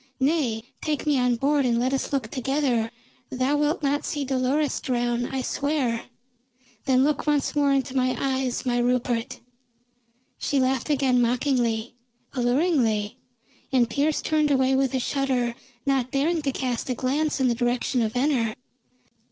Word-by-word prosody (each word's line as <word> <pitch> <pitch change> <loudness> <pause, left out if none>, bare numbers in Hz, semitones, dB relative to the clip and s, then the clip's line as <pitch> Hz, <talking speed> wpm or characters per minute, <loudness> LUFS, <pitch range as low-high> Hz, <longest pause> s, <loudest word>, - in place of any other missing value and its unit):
Nay, 265 -6 +1 0.2
take 305 -1 -2
me 290 -3 +2
on 250 -1 +2
board, 280 +4 +2
and 240 -2 +2
let 255 +2 0
us 270 - -1
look 265 -6 -2
together. 260 -3 0 0.4
Thou 260 +3 0
wilt 295 +2 0
not 285 +1 +1
see 290 -2 -2
Dolores 265 +3 0
drown, 240 -1 -1
I 265 -1 -3
swear. 280 -6 -1 0.8
Then 260 -1 +4
look 300 +1 0
once 295 -1 +1
more 285 -1 +3
into 270 -1 0
my 255 -1 +1
eyes, 265 -2 -1
my 245 -1 +1
Rupert!" 240 -1 -1 1.0
She 280 - 0
laughed 260 +1 0
again 265 -4 +3
mockingly, 240 -2 0 0.4
alluringly, 245 - +1 0.5
and 250 -3 +3
Pearse 295 +2 0
turned 305 -1 +2
away 265 -1 +3
with 265 -1 +1
a - - +1
shudder, 255 -3 0 0.3
not 270 -3 +1
daring 310 +5 +1
to 280 -2 -1
cast 255 -2 -3
a 250 - 0
glance 285 +5 0
in 260 - +3
the 240 - +2
direction 245 +1 0
of 220 -1 -1
Venner. 250 -4 +1
260 Hz, 155 wpm, -25 LUFS, 245-285 Hz, 1.0 s, Then